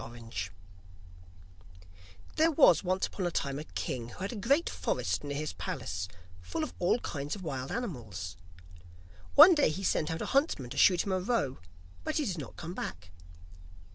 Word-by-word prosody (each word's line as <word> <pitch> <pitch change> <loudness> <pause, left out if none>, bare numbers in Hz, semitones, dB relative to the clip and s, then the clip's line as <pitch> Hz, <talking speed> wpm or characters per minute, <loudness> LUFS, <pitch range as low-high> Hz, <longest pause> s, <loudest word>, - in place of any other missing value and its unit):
IRON 115 +1 -10
HANS 115 -6 -5 1.9
There 320 +1 +5
was 275 - +6
once 185 +1 +1
upon 185 -3 -3
a - - +1
time 140 -4 -2
a - - -5
king 120 -6 -4
who - - -12
had 195 +5 -4
a - - -5
great 275 - +2
forest - - -1
near 145 -1 -3
his 155 0 -3
palace, 85 +1 -4 0.3
full 85 - -3
of - - -4
all 180 +5 +3
kinds 145 +1 -4
of 195 - -9
wild 135 -5 -4
animals. 110 - -4 1.0
One 325 +6 +11
day 295 -3 +4
he 185 +6 -4
sent 155 -4 +1
out 160 0 -2
a - - -4
huntsman 270 - +1
to - - -6
shoot 180 -2 +5
him 200 - -2
a 185 - +1
roe, 180 - 0 0.4
but 310 - -2
he 300 - +1
did 180 -7 -2
not 140 - -8
come 170 +1 -6
back. 90 - -6
160 Hz, 185 wpm, -31 LUFS, 125-205 Hz, 1.9 s, One